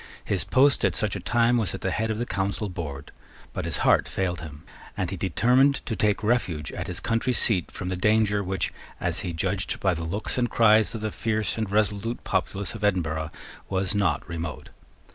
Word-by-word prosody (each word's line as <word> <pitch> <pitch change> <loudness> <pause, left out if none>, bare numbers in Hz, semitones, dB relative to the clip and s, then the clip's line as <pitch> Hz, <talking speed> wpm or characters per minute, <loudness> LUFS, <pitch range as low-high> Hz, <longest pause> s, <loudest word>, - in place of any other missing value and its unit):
His 95 - 0
post, 140 +1 +3
at - - +2
such 105 -2 0
a - - -3
time, 120 +5 +2
was 110 - -1
at - - -8
the 95 - -1
head 110 +4 -1
of 110 - -1
the 120 - -1
Council 100 0 -2
board: 75 -6 -6 0.4
but - - -3
his - - -2
heart - - +4
failed 90 -4 -2
him; 75 -2 -9 0.3
and 90 -1 -1
he - - -2
determined 125 - +3
to 115 - -2
take 105 0 +1
refuge 100 -10 0
at - - -5
his 90 0 -4
country 115 +5 0
seat 100 -7 +4
from 90 - -5
the 95 - -1
danger 105 +1 +2
which, 95 +1 -2 0.3
as - - 0
he 90 - -3
judged 95 +4 -2
by 95 -2 +2
the 85 -1 -4
looks 100 +9 -2
and 120 -1 +1
cries 110 0 +4
of 110 - -5
the 110 0 -2
fierce 110 -1 -1
and 110 -3 -2
resolute 105 +3 0
populace 95 +1 -2
of 110 -2 -8
Edinburgh, 80 -6 0 0.4
was 95 0 0
not 105 -2 0
remote. 80 -2 -5
100 Hz, 205 wpm, -26 LUFS, 90-110 Hz, 0.4 s, heart